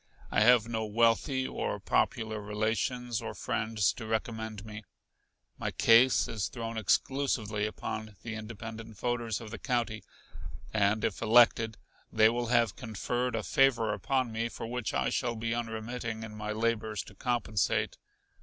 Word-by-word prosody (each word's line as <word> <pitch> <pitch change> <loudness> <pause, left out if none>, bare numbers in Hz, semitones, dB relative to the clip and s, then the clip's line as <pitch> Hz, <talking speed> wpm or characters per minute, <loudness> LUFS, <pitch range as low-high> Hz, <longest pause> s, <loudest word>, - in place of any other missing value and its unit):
I - - +3
have 120 0 +6
no 115 -1 -2
wealthy 115 +5 +2
or - - -3
popular 110 -1 0
relations 110 +3 -1
or 115 - -5
friends 110 -3 0
to 110 - -8
recommend 110 -1 -3
me. 105 0 -8 0.8
My - - -1
case 120 +3 +5
is 110 -4 -2
thrown 115 -2 -5
exclusively 110 -1 0
upon 110 0 -5
the 115 - -5
independent 110 0 -7
voters 120 -3 -1
of 110 -2 -9
the 110 - -6
county; 115 -4 -1 0.7
and 105 0 +2
if - - -2
elected 115 -1 +5 0.3
they 110 0 +6
will 120 +1 -1
have 115 -4 +3
conferred 120 +2 -2
a 110 - -2
favor 115 - +3
upon 130 -3 0
me 115 +1 -2
for 115 - -7
which 120 -2 -3
I - - 0
shall 120 -1 -1
be 115 +1 -2
unremitting 115 0 -4
in 110 -1 -7
my 105 0 -4
labors 110 -1 -1
to - - -14
compensate. 115 -2 0
115 Hz, 150 wpm, -30 LUFS, 110-120 Hz, 0.8 s, have